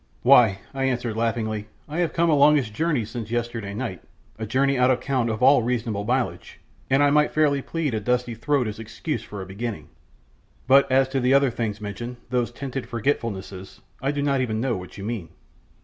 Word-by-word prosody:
"Why," 120 Hz, -6 st, +6 dB, 0.2 s
I 135 Hz, 0 st, -1 dB
answered 125 Hz, -4 st, -1 dB
laughingly, 110 Hz, -2 st, -1 dB, 0.2 s
"I 155 Hz, +3 st, -4 dB
have 175 Hz, -2 st, +1 dB
come 170 Hz, 0 st, +1 dB
a 160 Hz, -, +4 dB
longish 145 Hz, -5 st, +4 dB
journey 150 Hz, -1 st, 0 dB
since 110 Hz, 0 st, -6 dB
yesterday 115 Hz, -4 st, -3 dB
night 95 Hz, -8 st, -4 dB, 0.4 s
a 110 Hz, -, -4 dB
journey 135 Hz, +5 st, +2 dB
out 125 Hz, 0 st, +3 dB
of 130 Hz, -1 st, +2 dB
count 130 Hz, -3 st, 0 dB
of 110 Hz, +2 st, -2 dB
all 135 Hz, 0 st, +6 dB
reasonable 115 Hz, -4 st, -2 dB
mileage 125 Hz, +2 st, -2 dB, 0.3 s
and 135 Hz, +2 st, +4 dB
I 145 Hz, -, +4 dB
might 150 Hz, 0 st, +4 dB
fairly 145 Hz, -3 st, +3 dB
plead 155 Hz, -2 st, -2 dB
a 110 Hz, -, 0 dB
dusty 125 Hz, +2 st, 0 dB
throat 125 Hz, +2 st, 0 dB
as 110 Hz, 0 st, -6 dB
excuse 115 Hz, +7 st, -4 dB
for 100 Hz, -2 st, -7 dB
a -, -, -9 dB
beginning; 105 Hz, +3 st, -6 dB, 0.8 s
but 135 Hz, +1 st, +5 dB
as 135 Hz, 0 st, +4 dB
to 135 Hz, 0 st, -1 dB
the 130 Hz, +2 st, +3 dB
other 140 Hz, -2 st, +4 dB
things 110 Hz, -3 st, -3 dB
mentioned, 120 Hz, +4 st, -6 dB
those 120 Hz, -2 st, 0 dB
tinted 135 Hz, 0 st, -5 dB
forgetfulnesses, 100 Hz, -6 st, -3 dB, 0.2 s
I 135 Hz, -, 0 dB
do 145 Hz, 0 st, -1 dB
not 140 Hz, -2 st, +1 dB
even 110 Hz, -4 st, -1 dB
know 125 Hz, 0 st, 0 dB
what 90 Hz, +1 st, -9 dB
you 100 Hz, -, -7 dB
mean." 105 Hz, -7 st, -4 dB
120 Hz, 200 wpm, -24 LUFS, 110-135 Hz, 0.8 s, Why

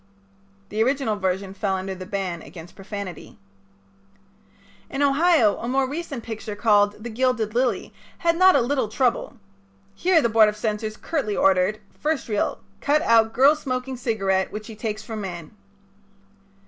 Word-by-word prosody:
The 215 Hz, +2 st, +1 dB
original 265 Hz, -3 st, 0 dB
version 190 Hz, 0 st, -2 dB
fell 195 Hz, -1 st, -1 dB
under 190 Hz, 0 st, -4 dB
the 185 Hz, 0 st, -8 dB
ban 190 Hz, -4 st, -3 dB
against 170 Hz, +1 st, -12 dB
profanity. 200 Hz, -2 st, -8 dB, 1.5 s
In 275 Hz, -, -1 dB
Ohio 285 Hz, -, +4 dB
a 235 Hz, -, -5 dB
more 265 Hz, +1 st, +1 dB
recent 285 Hz, -4 st, -5 dB
picture 220 Hz, -2 st, -6 dB
called 205 Hz, -1 st, +2 dB
"The 240 Hz, -, -5 dB
Gilded 235 Hz, -2 st, 0 dB
Lily" 250 Hz, +1 st, 0 dB, 0.2 s
had 335 Hz, 0 st, +1 dB
not 370 Hz, +2 st, +6 dB
a 275 Hz, -, +4 dB
little 260 Hz, 0 st, 0 dB
trouble. 245 Hz, +2 st, -1 dB, 0.6 s
Here 345 Hz, -, +3 dB
the 240 Hz, -, +2 dB
Board 220 Hz, -1 st, +5 dB
of 210 Hz, -, -6 dB
Censors 215 Hz, 0 st, -3 dB
curtly 275 Hz, -11 st, -2 dB
ordered: 195 Hz, +2 st, +3 dB, 0.2 s
"First 310 Hz, -1 st, -1 dB
Reel 210 Hz, -2 st, -1 dB, 0.2 s
Cut 300 Hz, +2 st, +2 dB
out 225 Hz, -4 st, +4 dB
girl 275 Hz, +6 st, +5 dB
smoking 260 Hz, -2 st, -4 dB
cigarette 195 Hz, -6 st, 0 dB
which 210 Hz, 0 st, -6 dB
she 225 Hz, -, -9 dB
takes 215 Hz, 0 st, -4 dB
from 215 Hz, 0 st, -6 dB
man." 175 Hz, -5 st, -7 dB
220 Hz, 155 wpm, -23 LUFS, 205-265 Hz, 1.5 s, not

